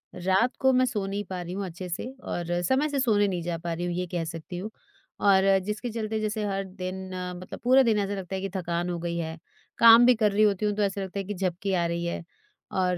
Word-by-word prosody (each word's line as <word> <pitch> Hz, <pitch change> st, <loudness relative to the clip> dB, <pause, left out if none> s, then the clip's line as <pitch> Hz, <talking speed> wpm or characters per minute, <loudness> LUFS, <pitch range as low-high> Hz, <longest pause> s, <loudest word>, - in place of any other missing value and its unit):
रात 190 Hz, +7 st, +1 dB
को 265 Hz, 0 st, +4 dB
मैं 255 Hz, 0 st, +4 dB
सो 210 Hz, -6 st, -2 dB
नहीं 200 Hz, +1 st, -3 dB
पा 180 Hz, -1 st, -4 dB
रही 175 Hz, +1 st, -6 dB
हूँ 195 Hz, 0 st, -3 dB
अच्छे 180 Hz, +1 st, -7 dB
से 170 Hz, -, -3 dB, 0.2 s
और 175 Hz, 0 st, -2 dB
समय 270 Hz, -, +2 dB
से 280 Hz, -, -1 dB
सोने 210 Hz, -5 st, +3 dB
नहीं 180 Hz, -3 st, -2 dB
जा 170 Hz, -1 st, -2 dB
पा 170 Hz, 0 st, -4 dB
रही 175 Hz, +2 st, -3 dB
हूँ, 175 Hz, -, -2 dB
ये 180 Hz, 0 st, -1 dB
कह 175 Hz, -1 st, -2 dB
सकती 165 Hz, +2 st, -7 dB
हूँ। 200 Hz, +5 st, -5 dB, 0.5 s
और 195 Hz, -1 st, +5 dB, 0.2 s
जिसके 210 Hz, +4 st, -3 dB
चलते 220 Hz, -1 st, -3 dB
जैसे 215 Hz, 0 st, -2 dB
हर 195 Hz, -1 st, -1 dB
दिन 190 Hz, 0 st, -6 dB, 0.3 s
मतलब 185 Hz, -, -8 dB
पूरा 260 Hz, +2 st, +6 dB
दिन 225 Hz, -4 st, +2 dB
ऐसा 200 Hz, 0 st, -1 dB
लगता 190 Hz, -1 st, -5 dB
है 190 Hz, -, -3 dB
कि 195 Hz, -, -3 dB
थकान 175 Hz, -1 st, -2 dB
हो 175 Hz, -, -2 dB
गई 170 Hz, 0 st, -3 dB
है। 160 Hz, -1 st, -4 dB, 0.4 s
काम 230 Hz, +1 st, +9 dB
भी 250 Hz, -, +6 dB
कर 215 Hz, -2 st, +2 dB
रही 210 Hz, +2 st, +3 dB
होती 205 Hz, 0 st, +2 dB
हूँ 210 Hz, -, +1 dB
तो 210 Hz, -, -1 dB
ऐसा 200 Hz, 0 st, -1 dB
लगता 190 Hz, +1 st, -4 dB
है 195 Hz, -, -2 dB
कि 205 Hz, -, -4 dB
झपकी 190 Hz, +1 st, -2 dB
आ 175 Hz, -2 st, +2 dB
रही 170 Hz, 0 st, -2 dB
है। 170 Hz, -, -3 dB, 0.5 s
और 180 Hz, -1 st, +1 dB
190 Hz, 260 wpm, -27 LUFS, 175-210 Hz, 0.5 s, काम